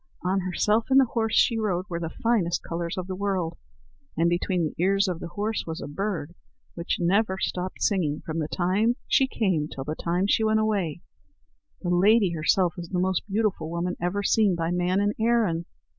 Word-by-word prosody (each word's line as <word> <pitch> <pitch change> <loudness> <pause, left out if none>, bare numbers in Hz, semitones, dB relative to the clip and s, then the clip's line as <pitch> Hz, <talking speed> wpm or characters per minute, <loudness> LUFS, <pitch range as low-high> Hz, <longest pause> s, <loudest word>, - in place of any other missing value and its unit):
On 185 +2 +1
herself 210 +5 +1
and 270 0 +6
the 270 - +5
horse 225 -1 0
she 230 -2 +4
rode 185 -4 -1
were 170 -3 -4
the 165 -1 -3
finest 205 -5 0
colours 170 +2 -4
of 185 - -3
the 185 - -5
world, 185 -4 -1 0.6
and 170 +1 +3
between 175 0 0
the 160 +2 -2
ears 195 +1 +3
of 180 -3 -2
the - - -6
horse 210 +5 -2
was 160 0 -4
a - - -6
bird 170 0 -3 0.4
which 170 0 -2
never 190 +2 +2
stopped 185 -1 -3
singing 160 -8 0
from 160 0 -3
the 155 - -1
time 195 +8 +1
she 265 - +3
came 185 - 0
till 135 -3 -7 0.4
she 210 +2 +2
went 220 0 +3
away. 195 -7 -1 0.8
The 175 - -1
lady 195 +2 +4
herself 170 +2 +2
is 170 -1 -7
the 185 - -2
most 185 0 +1
beautiful 200 -6 0
woman 170 +2 -2
ever 185 +4 -1
seen 205 -2 +3
by 165 0 -1
man 180 +2 +1
in 205 +1 +1
Erin." 220 -8 +2
185 Hz, 190 wpm, -26 LUFS, 170-210 Hz, 0.8 s, and